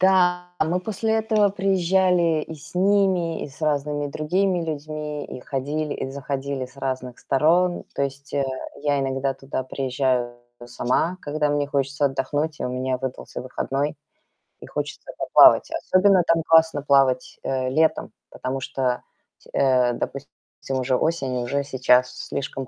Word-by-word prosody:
Да, 180 -1 +3
а - - +3
мы 175 +3 0
после 220 +3 -2
этого 215 -2 +2
приезжали 185 -4 +2
и 160 - -7
с 155 +3 -14
ними, 185 -3 +2
и - - -7
с 135 - -17
разными 145 -1 0
другими 175 +5 0
людьми, 150 -1 -4
и - - -8
ходили, 145 +3 -3
и - - -4
заходили 140 0 -3
с 130 +2 -14
разных 130 -2 -4
сторон. 170 +6 +2
То - - -4
есть, 140 +2 -5
э, 140 - +1 0.4
я 145 -1 +1
иногда 135 0 -1
туда 135 0 -4
приезжаю 130 -2 -1 0.3
сама, 125 +9 -1
когда 150 -1 -1
мне 145 0 0
хочется 140 +1 0
отдохнуть 145 +3 -2
и - - -3
у - - -2
меня 130 +1 -1
выдался 130 0 -6
выходной, 135 +3 -2 0.7
и - - -11
хочется - - -5
поплавать. - - +6
Особенно 190 0 +3
там 165 -1 +3
классно 160 -3 +4
плавать, 135 -3 +2
э, 130 -1 -1
летом, 160 +4 +1 0.2
потому 130 +1 -4
что, 130 -1 -1 0.5
э, 125 -2 +3
допустим, 140 +3 -5 0.5
уже 130 0 +1
осень 135 -4 0
и - - -2
уже 140 +4 -1
сейчас 125 -2 +3 0.2
слишком 135 -1 -4
145 Hz, 150 wpm, -23 LUFS, 130-165 Hz, 0.7 s, поплавать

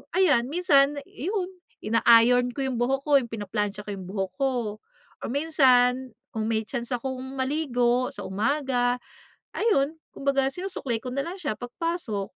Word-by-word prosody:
ayan 290 -11 +4
minsan 285 -3 +3
'yon, 375 - -3 0.3
ina-iron 235 +2 +5
ko 275 - -2
yung 260 -3 -2
buhok 270 +3 0
ko 290 -2 +5
yung 245 - -5
pinaplantsa 205 -1 -3
ko 210 - -6
yung 190 -2 -7
buhok 190 -1 -3
ko 270 -1 +2 0.7
or - - -5
minsan 260 -4 +3 0.2
kung 220 -2 -2
may 220 -1 0
chance 240 +2 -3
akong 260 +1 -4 0.2
maligo 255 -3 +1
sa 275 - -7
umaga 245 +4 0 0.6
ayun 315 -10 +2 0.2
kumbaga 275 -1 +1
sinusuklay 300 -9 -3
ko 255 - -7
nalang 335 +8 -3
siya 295 - -2
pag 245 +2 -8
pasok. 330 - -2
260 Hz, 150 wpm, -26 LUFS, 230-285 Hz, 0.7 s, ina-iron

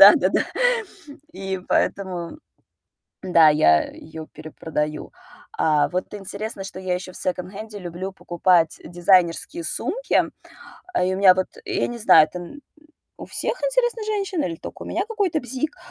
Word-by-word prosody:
Да-да-да. - - +8 0.9
И 190 -1 -4
поэтому, 185 - -1 0.9
да, 165 -4 +6
я 80 - +5
её 160 0 -9
перепродаю. 155 -1 -4 0.5
А, 150 -2 +3
вот 180 +3 -3
интересно, 200 +1 -6
что 185 -1 -8
я 185 -1 -2
ещё 185 0 -7
в - - -8
секонд-хенде 200 +4 -4
люблю 180 +2 -5
покупать 175 -2 +2
дизайнерские 175 -1 +2
сумки. 450 - +1 0.8
И 185 +1 +1
у - - -4
меня 195 -2 +7
вот, 185 - 0 0.2
я 390 +1 0
не 240 - -6
знаю, 185 -8 +6
это 180 - -6 0.8
у - - -7
всех, - - -2
интересно, 485 -2 +1
женщин 395 -6 -1
или 165 -2 -3
только - - -9
у - - -8
меня 370 +4 -1
какой-то 395 -8 0
бзик. 265 +7 -4
185 Hz, 140 wpm, -23 LUFS, 170-245 Hz, 0.9 s, Да-да-да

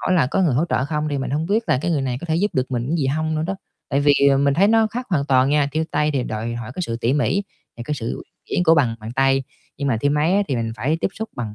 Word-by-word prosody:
hỏi - - 0
là 155 -7 +3
có 190 +8 0
người 155 -8 +2
hỗ 150 +7 +2
trợ 130 - +1
không 150 +1 -2
thì 140 - -1
mình 135 - -3
hông 155 +4 -1
biết 220 +4 +1
là 150 -5 +3
cái 175 - 0
người 150 -5 +1
này 130 -2 -2
có - - -7
thể 160 -1 0
giúp 205 +5 +1
được 130 0 -1
mình 125 +4 -1
gì 145 - 0
hông 155 +3 -1
nữa 155 - -1
đó. 190 +4 -2 0.3
Tại 140 - +1
vì 145 0 +5 0.3
mình 140 0 +2
thấy 195 +6 +4
nó 225 0 +4
khác 245 +3 -5
hoàn 145 -6 +1
toàn 130 -1 +3
nha, 145 -1 +2
thêu 160 +2 0
tay 150 0 +1
thì 135 -3 0
đòi 115 +1 -4
hỏi 120 -2 -6
cái 180 - -3
sự 115 -8 -3
tỉ 120 +3 +1
mỉ 165 +7 +1 0.3
và 120 - -6
cái 150 - -1
sự 115 -6 -6
uyển - - -10 0.2
chuyển 180 - -1
của 165 -1 +6
bàn 125 -7 +2
bàn 110 +1 -7
tay. 135 +1 +2 0.3
Nhưng 140 - -2
mà 125 - +2
thêu 145 - +2
máy 150 +5 +2
á, 205 - +3
thì 135 - 0
mình 115 -1 -2
phải 135 +9 0
tiếp - - +1
xúc 220 +1 -6
bằng 110 -4 -4
145 Hz, 320 wpm, -21 LUFS, 130-165 Hz, 0.3 s, của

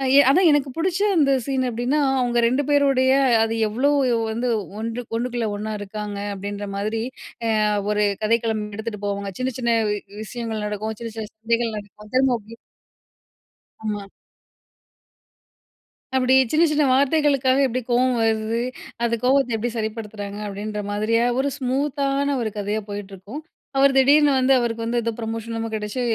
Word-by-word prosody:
எ - - +9
அதான் 355 +6 +5
எனக்கு 290 -2 +2
பிடிச்ச 355 +2 0 0.2
அந்த 290 -4 +4
சீனு 265 -2 0
அப்பிடின்னா, 245 +5 0 0.2
அவுங்க 240 -1 +1
ரெண்டு 255 +4 +2
பேருடைய 275 -3 +3 0.3
அது 225 0 -1
எவ்ளோ 250 +7 +1 0.4
வந்து 235 +3 -2 0.3
ஒன்று, 230 +2 -3 0.2
ஒன்னுக்குள்ள 240 -1 -2
ஒன்னா 215 +1 -4
இருக்காங்க, 205 0 -5 0.2
அப்பிடின்ற 205 +1 -5
மாதிரி 215 +2 -2 0.5
அ - - +1 0.4
ஒரு 210 0 +2 0.2
கதைக்களம் 225 -1 +1
எடுத்துட்டு 215 -1 -6
போவாங்க. 200 0 -3
சின்ன, 255 0 -1
சின்ன 235 -2 +2 0.5
விஷயங்கள் 225 -2 -4
நடக்கும். 215 +1 -4
சின்ன, 230 -1 -5
சின்ன 215 -1 -5
சண்டைகள் 230 0 -1
நடக்கும். 210 +1 -11
திரும்ப 260 -1 +4
அப்பிடியே 225 +1 -13 1.3
ஆமா. 205 -2 -3 2.1
அப்பிடி 260 0 +3 0.2
சின்ன, 315 +2 +4
சின்ன 300 0 +2
வார்த்தைகளுக்காகவே 275 -1 +3
எப்பிடி 255 +1 -2
கோவம் 250 +1 +3
வருது, 220 +1 0 0.4
அந்த 235 0 +2
கோவத்த 255 -2 +3
எப்பிடி 230 +2 -2
சரிப்படுத்துறாங்க, 215 -2 -5
அப்பிடின்ற 210 +1 -4
மாதிரிய 215 +3 +1 0.2
ஒரு 280 +1 +1
ஸ்மூத் 275 +2 -1
தான 280 +1 +1
ஒரு 225 - -1
கதையா 205 +1 -1
போயிட்டுருக்கும். 205 +6 -7 0.4
அவர் 270 0 +5
திடீர்னு 285 +2 +6
வந்து 260 +1 +4
அவருக்கு 230 -1 -2
வந்து 240 +1 0
ஏதோ 230 - 0
ப்ரமோஷன் 225 0 -4
லாம் 225 0 -4
கிடைச்சு, 210 +4 -3
230 Hz, 145 wpm, -22 LUFS, 215-260 Hz, 2.1 s, எ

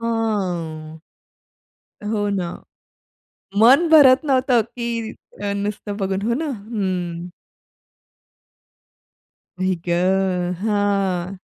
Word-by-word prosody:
हां. 180 -9 -2 1.1
हो 205 -2 0
ना. 185 -4 -2 1.1
मन 270 +10 +6
भरत 285 -2 +7
नव्हतं 255 -3 +3
की 230 0 -4 0.3
अ, 200 0 -1
नुसतं 205 0 -4
बघून. 195 -1 -2
हो 235 +3 0
ना. 315 +4 -2
हं. 185 -7 -4 2.3
आई 185 0 +1
गं! 180 0 +1
हां. 195 -3 0
205 Hz, 85 wpm, -21 LUFS, 185-230 Hz, 2.3 s, भरत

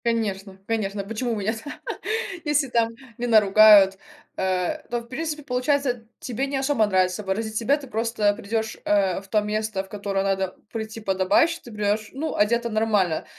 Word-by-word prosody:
Конечно 200 -4 -1
конечно 210 -3 -1
почему 225 +4 -3
у - - -1
меня 210 +1 -1
та 225 +6 -8 0.6
если 295 -2 +1
там 230 -1 +1 0.2
не 245 - -2
наругают, 210 -3 +7 0.4
а, 185 - 0
то, 240 0 -2
в 235 - -16
принципе, 300 +4 -4
получается 250 -2 0
тебе 260 +3 -3
не 280 - -3
особо 265 -5 +2
нравится 185 0 +1
выразить 215 +3 -2
себя. 265 +6 +2
Ты 285 -2 -10
просто 225 -2 +1
придешь, 220 +2 -3
э, 195 -3 +2
в 195 - -17
то 210 +1 +2
место, 210 -1 -2
в 190 - -17
которое 200 -1 -2
надо 190 -1 -1 0.2
прийти 220 0 -5
подобающе, 200 - +2
ты 240 - -11
придешь, 210 0 -1
ну, 300 +5 -3
одето 235 +3 +2
нормально, 210 -7 +1
220 Hz, 170 wpm, -24 LUFS, 200-240 Hz, 0.6 s, наругают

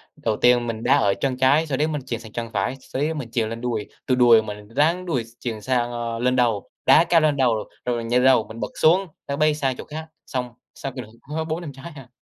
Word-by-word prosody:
Đầu 110 -2 -2
tiên 120 -1 +4
mình 115 -1 -4
đá - - +4
ở 100 -1 +3
chân 130 -2 0
trái, 140 +5 +3
sau 135 -3 -1
đấy 150 +3 +1
mình 150 -2 -3
chuyền 120 -3 -3
sang 110 -2 -12
chân 115 0 -4
phải, 100 +5 -1
sau 130 +1 -6
đấy 155 +2 0
mình 130 -7 -6
chuyền 110 -2 0
lên 115 0 -6
đùi, 115 -4 -2 0.2
từ 130 - +2
đùi 120 -3 +6
mình 105 -1 -8
ráng 170 +5 +2
đùi 140 -9 -1
s - - -16
chuyền 115 -3 -4
sang, 120 0 0
ơ, 115 -1 -4
lên 125 +1 +1
đầu, 115 -5 +1 0.2
đá - - +7
cao 165 -2 +5
lên 150 -2 +2
đầu, 115 -5 +1 0.2
rồi 120 -1 0
mình 115 -1 -4
nhà 120 +2 +3
lầu 130 -3 +4
mình 110 +2 -9
bật - - -4
xuống, 185 +5 +4 0.2
nó 140 - -2
bay 155 0 +3
sang 135 -3 -1
chỗ - - -7
khác. 155 +1 -7 0.2
Xong, 125 -2 -4 0.2
sau 135 - -5
kỷ 130 0 -6
lục 110 -2 -12
có 155 +3 -4
4-5 160 -1 -4
trái 135 +6 -10
à. 135 -4 -12
125 Hz, 270 wpm, -23 LUFS, 115-145 Hz, 0.2 s, đá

